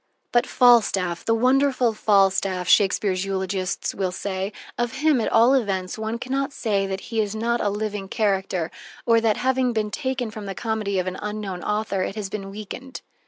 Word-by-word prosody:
"But 240 +1 +3
Falstaff, 205 -8 +3
the 225 - +3
wonderful 255 0 +3
Falstaff," 195 -3 +2
Shakespeare's 195 -2 +3
eulogists 190 -1 -2
will 190 -2 -1
say, 190 +1 -3 0.2
"of 240 -1 -2
him, 295 -3 +2
at - - -1
all 235 +4 +5
events, 195 -8 0
one 220 +1 -3
can 255 +2 -7
not 275 +1 0
say 200 -7 -1
that 190 0 -4
he 225 - +2
is 210 0 -3
not 235 +2 0
a 205 - +1
living 205 -1 -3
character, 190 -5 -1 0.3
or 230 -1 +4
that, 220 -2 +2
having 255 -1 +1
been 215 -2 -1
taken 260 -4 -2
from 215 -2 -7
the 195 - -5
comedy 215 -3 -2
of 185 - 0
an 185 0 -4
unknown 210 -3 -4
author, 210 -2 -1
it 195 - -3
has 210 -3 -4
been 195 -1 -5
weakened." 215 +6 -8
210 Hz, 185 wpm, -23 LUFS, 195-235 Hz, 0.3 s, all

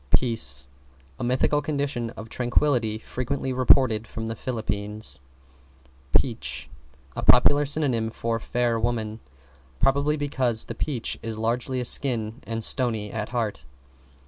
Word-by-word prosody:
=PEACE= 65 - +2 0.5
A - - -3
mythical 130 +4 +2
condition 140 -5 -2
of 110 - -7
tranquillity 120 -2 +1
frequently 130 +3 -3
reported 125 -3 +4
from 110 - -5
the 115 0 -3
Phillipines. 105 - -3 0.9
=PEACH= - - 0 0.4
A - - -3
popular 145 +4 +5
synonym 135 -7 +1
for 115 0 -2
Fair 120 0 0
Woman, 110 -2 -2 0.6
probably 140 +3 +2
because 130 -6 0
the - - -6
peach 130 -7 -2
is 115 -1 -4
largely 120 +3 -1
a 125 - -2
skin 120 -2 +2
and 115 0 -3
stony 110 -6 +1
at 110 -2 -4
heart. 110 - -3
120 Hz, 125 wpm, -25 LUFS, 110-130 Hz, 0.9 s, popular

